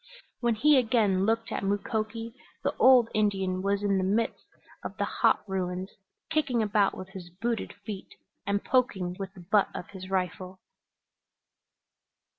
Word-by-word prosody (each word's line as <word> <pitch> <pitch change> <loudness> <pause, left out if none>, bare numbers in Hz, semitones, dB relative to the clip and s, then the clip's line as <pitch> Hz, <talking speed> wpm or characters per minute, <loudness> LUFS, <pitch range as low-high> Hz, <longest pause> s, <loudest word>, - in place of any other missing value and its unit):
When 235 -2 +1
he 295 +6 +5
again 215 -5 +2
looked 225 0 0
at - - -2
Mukoki 220 +3 -2 0.3
the - - 0
old 255 -3 +7
Indian 195 -3 +1
was 200 +1 0
in 200 -1 +2
the - - 0
midst 215 +4 -1 0.4
of - - -6
the - - 0
hot - - +1
ruins, 185 0 -3 0.4
kicking 280 -7 +1
about 205 -1 +2
with 185 - -8
his 185 -2 -9
booted 225 +6 -3
feet 200 -3 -7 0.3
and 200 0 -1
poking 195 -9 +1
with 195 0 -6
the 185 - -11
butt 200 +3 +2
of - - -6
his 190 -1 -9
rifle. 185 0 -2
200 Hz, 150 wpm, -28 LUFS, 190-225 Hz, 0.4 s, old